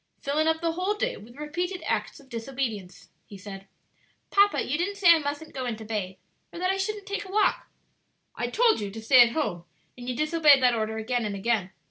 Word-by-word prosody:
"Filling 300 +3 0
up 320 0 +1
the 335 -1 +1
whole 365 +5 -1
day 415 - -1
with 235 +4 -14
repeated 350 +6 -4
acts - - -2
of 275 - -18
disobedience," 230 -6 -5 0.2
he 200 - -11
said. 195 0 -10 0.6
"Papa, 405 +1 +4
you 265 - 0
didn't 365 +5 -1
say 365 -4 +6
I 330 - +2
mustn't 290 +1 -5
go 260 -2 -4
in 235 - -2
to 220 0 -10
bathe, 205 -4 -3 0.4
or - - -10
that 365 +2 +1
I 385 - -1
shouldn't 405 +1 -3
take 405 +1 -3
a - - -11
walk." 420 +1 +1 0.7
"I 240 - -2
told 455 - +3
you 205 -2 -4
to 215 +3 -8
stay 245 +3 +6
at 235 -1 +5
home, 175 - -2 0.3
and 245 0 -7
you 250 - -2
disobeyed 305 -2 +4
that 250 -1 +5
order 220 -1 -2
again 240 +2 -1
and 205 -2 -3
again. 200 -2 0
270 Hz, 220 wpm, -26 LUFS, 220-340 Hz, 0.7 s, say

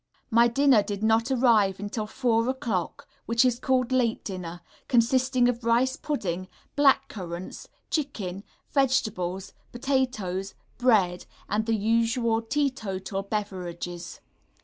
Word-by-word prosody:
My 235 +1 +6
dinner 260 -1 +4
did 200 0 -5
not 225 +2 +3
arrive 230 -7 +3
until 210 +1 -4
4 230 0 +1
0 235 - -1
o'clock, 225 - -3 0.2
which 230 +2 +3
is 245 -1 +1
called 255 -1 +1
late 245 -3 +1
dinner, 180 -3 -6 0.3
consisting 255 +1 +3
of 245 -1 -1
rice 240 +3 +2
pudding, 185 - -3 0.3
black 285 -2 +4
currants, 175 -2 -7 0.2
chicken, 205 - -3 0.3
vegetables, 220 -10 0 0.2
potatoes, 240 -8 -1 0.2
bread, 200 -8 +2 0.2
and 215 +2 -1
the 225 - +2
usual 230 +1 +1
teetotal 220 -7 -2
beverages. 180 -4 -5
225 Hz, 120 wpm, -26 LUFS, 195-255 Hz, 0.3 s, My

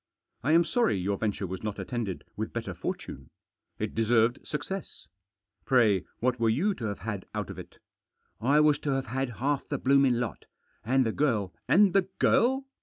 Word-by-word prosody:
I 150 +5 +2
am 170 +1 +6
sorry 220 - +1
your 95 +2 -1
venture 105 -2 -1
was 95 0 -5
not 105 -2 -4
attended 115 -7 -4
with - - -4
better - - -4
fortune. 65 -1 -6 0.5
It - - -3
deserved 115 +2 +2
success. 155 +7 -6 0.6
Pray 110 -8 +3
what 125 0 0
were 115 -1 +3
you 185 - +2
to 120 - -6
have 100 -2 -3
had 100 -1 -5
out - - -3
of - - -9
it? - - -11 0.2
" - - -58
" - - -45
I 140 +6 +4
was 150 -1 +4
to 150 - -3
have 135 0 -1
had 130 +1 -2
half 140 +2 -1
the 145 - -1
blooming 135 -1 +4
lot 120 -3 -4 0.4
And 130 +3 +2
the 110 - +1
girl 110 -9 0
" - - -50
"And 195 0 +5
the 195 -1 +2
girl! 265 +3 +3
125 Hz, 195 wpm, -28 LUFS, 110-150 Hz, 0.6 s, am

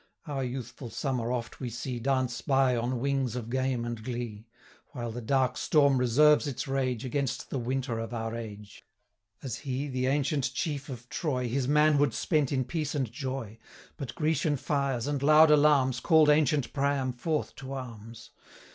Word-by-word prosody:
Our 140 -3 -3
youthful 125 0 -6
summer 125 0 -2
oft 120 -2 -4
we 125 - -3
see 120 +1 -4
Dance 130 -1 0
by 135 -3 +3
on 120 +1 -1
wings 135 -2 0
of 120 -2 -5
game 130 -2 0
and 120 -2 -5
glee, 120 -3 -5 0.5
While 120 -3 -4
the 120 +2 -6
dark 130 +2 +1
storm 140 -4 +3
reserves 150 +5 +4
its 140 0 -4
rage, 130 -3 -1
110 - - -3
Against 135 -1 -2
the 135 - -1
winter 125 -1 -2
of 115 +1 -5
our 115 -1 -3
age: 105 -3 -9 0.6
As 125 -4 -4
he, 135 +1 -3
the 130 -1 -1
ancient 140 -1 0
Chief 145 -4 -3
of 120 -2 -8
Troy, 130 -6 -1
His 130 +2 -1
manhood 145 -3 +3
spent 150 -5 +1
in 130 -2 0
peace 150 +1 -3
and 130 -6 -1
joy; 130 -4 -5 0.4
But 135 -7 -7
Grecian 155 -1 +1
fires, 135 -4 -1
and 145 -1 -2
loud 155 +2 +7
alarms, 145 -4 +4
Call'd 160 -1 +5
ancient 150 -2 +2
Priam 140 -2 0
forth 150 +5 -2
to 135 0 -7
arms. 115 -3 -8
130 Hz, 175 wpm, -29 LUFS, 120-145 Hz, 0.6 s, loud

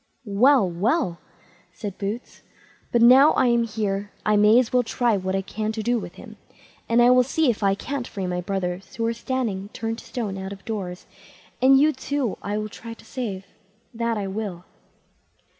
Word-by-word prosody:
"Well! 230 +2 +4
well!" 185 - 0 0.5
said 200 -4 -7
Boots; 210 +4 -5 0.5
"but 235 -1 +3
now 265 +5 +8
that - - -3
I - - +4
am 235 -1 +3
here, 205 -2 -3
I 210 - +3
may 210 +2 +6
as 250 -1 +2
well 250 - +5
try 240 -1 +1
what 190 0 -2
I 195 - -1
can 215 +2 -4
do 225 +2 0
with - - -9
him; - - -12 0.5
and 235 +1 +5
I 245 - +6
will 250 0 +6
see 270 +2 +2
if 220 - -7
I 195 -1 +3
can't 270 +3 -4
free 195 -2 -5
my 180 0 -2
brothers, 185 0 -4
who 230 - -1
are 230 - +1
standing 230 -5 -3
turned 225 0 -4
to - - -13
stone 205 -6 -4
out 190 +1 -5
of 195 - -14
doors; 185 -5 -5 0.6
and 265 +1 +6
you, 305 +2 +4
too, 265 -3 -2
I 205 +1 -3
will 215 0 -2
try 230 +2 -9
to - - -18
save, 200 -7 -5 0.5
that 230 -1 -1
I 205 - -2
will." 190 -3 -5
220 Hz, 195 wpm, -24 LUFS, 195-245 Hz, 0.6 s, now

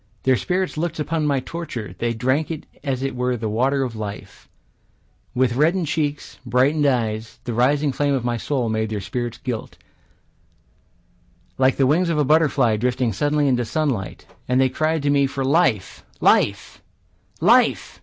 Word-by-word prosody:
Their 130 0 +4
spirits 185 +5 -2
looked 165 -1 -2
upon 155 +1 -1
my 140 -2 +1
torture; 130 - -6
They 120 0 0
drank 130 +6 0
it 160 -2 -5 0.2
as 135 -3 -2
it 135 -2 -2
were 125 0 -1
the 110 -1 -3
water 130 +6 +1
of 120 -3 -4
life; 105 -1 -8 0.9
With 125 -1 +2
reddened 165 +7 +2
cheeks, 150 -1 -3
brightened 135 +5 +2
eyes, 115 -4 -1
The 120 - -4
rising 140 +5 +2
flame 140 +1 0
of 125 -3 -2
my 120 -1 0
soul 125 +1 -1
made 110 0 -1
their 110 -1 -3
spirits 115 +4 -4
gilt, 120 -4 -5 1.8
Like 130 0 +4
the 135 - +3
wings 170 +6 +2
of 165 - 0
a 150 - +2
butterfly 140 -7 +3
drifting 125 0 0
suddenly 145 +6 +1
into 125 -2 +2
sunlight. 125 - -2 0.2
And 125 +1 +2
they 130 0 +4
cried 155 +2 -1
to 145 - +2
me 140 -1 +3
for 135 0 -3
life, 135 - +1 0.2
life, - - +2 0.6
life. - - +3
130 Hz, 165 wpm, -22 LUFS, 120-150 Hz, 1.8 s, Their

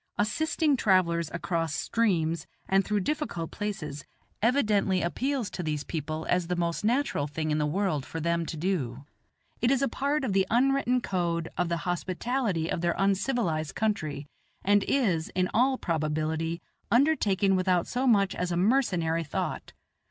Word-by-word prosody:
Assisting 305 +7 +1
travellers 170 -6 +2
across 165 -3 -2
streams 170 -8 0 0.2
and 195 0 +3
through 210 0 0
difficult 195 - -3
places 175 -9 -4 0.4
evidently 210 -6 +2
appeals 250 +5 -1
to - - -4
these 150 -3 -2
people 155 0 -4
as 180 -1 +1
the 180 - -1
most 170 -1 -1
natural 235 - +1
thing 155 +1 -3
in 150 - +1
the 150 - +1
world 170 -3 0
for 165 - -6
them 170 +1 0
to 160 - -5
do. 145 -7 -2 0.6
It 240 - +3
is 270 0 +2
a - - +3
part 280 +4 -1
of 230 -7 -1
the 190 -1 +2
un 255 +4 +4
written 255 -2 +1
code 170 -5 -1
of 175 -1 0
the 170 - 0
hospitality 185 +1 -1
of 165 - -2
their 175 0 +1
uncivilized 195 - 0
country, 155 -10 -1 0.4
and 205 0 +4
is, 185 -13 +1
in 185 0 +1
all 260 +3 +3
probability, 160 0 -1 0.3
undertaken 210 -8 +3
without 185 -2 +2
so 255 +2 -1
much 200 -5 +4
as 180 0 -2
a 170 - 0
mercenary 180 -7 +2
thought. 145 - -4
185 Hz, 160 wpm, -28 LUFS, 165-225 Hz, 0.6 s, un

